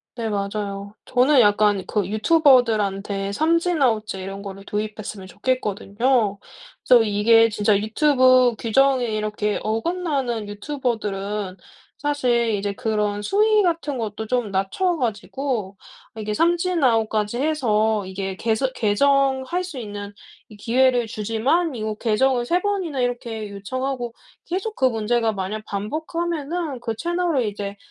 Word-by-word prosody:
네, 230 Hz, -2 st, -3 dB
맞아요. 200 Hz, 0 st, -4 dB
저는 255 Hz, +2 st, +4 dB
약간 205 Hz, -2 st, +3 dB
그 205 Hz, -4 st, -1 dB
유튜버들한테 215 Hz, -, +2 dB
삼진 335 Hz, -, +1 dB
아웃제 215 Hz, -6 st, +1 dB
이런 195 Hz, +1 st, -6 dB
거를 195 Hz, -1 st, -8 dB
도입했으면 210 Hz, -2 st, -5 dB
좋겠거든요. 215 Hz, 0 st, 0 dB, 0.5 s
그래서 245 Hz, -3 st, +7 dB
이게 225 Hz, +2 st, +4 dB
진짜 210 Hz, 0 st, +1 dB
유튜브 255 Hz, +1 st, +4 dB
규정이 260 Hz, +2 st, +2 dB
이렇게 210 Hz, -1 st, -2 dB
어긋나는 250 Hz, -, -2 dB
유튜버들은 205 Hz, -5 st, -3 dB, 0.4 s
사실 250 Hz, -5 st, +1 dB
이제 200 Hz, 0 st, -2 dB
그런 210 Hz, -3 st, -1 dB
수위 425 Hz, -, +3 dB
같은 330 Hz, -6 st, -1 dB
것도 220 Hz, -1 st, -4 dB
좀 240 Hz, -2 st, -1 dB
낮춰 195 Hz, -, 0 dB
가지고 225 Hz, -3 st, -3 dB, 0.4 s
이게 215 Hz, -1 st, -3 dB
삼진 345 Hz, -, +1 dB
아웃까지 225 Hz, -2 st, +1 dB
해서 220 Hz, -8 st, +1 dB
이게 190 Hz, 0 st, -4 dB
개선 230 Hz, +5 st, 0 dB
개정할 270 Hz, -, +2 dB
수 355 Hz, -7 st, -7 dB
있는 205 Hz, -3 st, -7 dB, 0.4 s
이 215 Hz, -, -14 dB
기회를 245 Hz, +2 st, +2 dB
주지만 230 Hz, -, 0 dB
이거 215 Hz, -1 st, -3 dB
개정을 240 Hz, +3 st, +1 dB
3 345 Hz, +8 st, +1 dB
번이나 375 Hz, -8 st, -2 dB
이렇게 235 Hz, -3 st, -3 dB
요청하고 240 Hz, +4 st, -4 dB, 0.3 s
계속 385 Hz, +5 st, -3 dB
그 265 Hz, -, -2 dB
문제가 225 Hz, -1 st, +1 dB
만약 200 Hz, +2 st, -4 dB
반복하면은 315 Hz, -, -3 dB
그 225 Hz, -2 st, -4 dB
채널을 340 Hz, -5 st, 0 dB
이제 205 Hz, -1 st, -5 dB
225 Hz, 295 characters per minute, -22 LUFS, 210-275 Hz, 0.5 s, 그래서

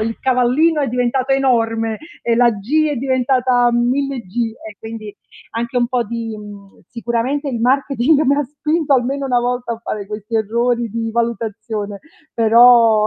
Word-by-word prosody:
il 225 Hz, +1 st, -3 dB
cavallino 265 Hz, +5 st, +2 dB
è 280 Hz, -, 0 dB
diventato 250 Hz, +2 st, 0 dB
enorme 225 Hz, -4 st, +1 dB, 0.2 s
e 235 Hz, -, +1 dB
la 240 Hz, 0 st, +4 dB
"g" 245 Hz, +10 st, 0 dB
è 295 Hz, -, -2 dB
diventata 255 Hz, -1 st, +2 dB
1000 260 Hz, +3 st, 0 dB
"g" 230 Hz, +4 st, -3 dB, 0.2 s
e 210 Hz, -, -13 dB
quindi 220 Hz, -2 st, -8 dB, 0.4 s
anche 235 Hz, +2 st, -3 dB
un 240 Hz, -1 st, +2 dB
po' 250 Hz, -2 st, 0 dB
di, 225 Hz, 0 st, -5 dB
mhmm, 205 Hz, -2 st, -12 dB
sicuramente 240 Hz, +4 st, -2 dB
il 240 Hz, -4 st, -3 dB
marketing 275 Hz, +3 st, +2 dB
mi 280 Hz, -1 st, +3 dB
ha 290 Hz, -, +1 dB
spinto 300 Hz, +2 st, 0 dB
almeno 270 Hz, +2 st, -1 dB
una 250 Hz, -2 st, +2 dB
volta 245 Hz, 0 st, -2 dB
a -, -, -12 dB
fare 215 Hz, -3 st, -5 dB
questi 210 Hz, +2 st, -7 dB
errori 235 Hz, +2 st, 0 dB
di 225 Hz, +1 st, -3 dB
valutazione, 220 Hz, -3 st, -3 dB, 0.3 s
però 230 Hz, -1 st, +5 dB
240 Hz, 160 wpm, -18 LUFS, 225-260 Hz, 0.4 s, però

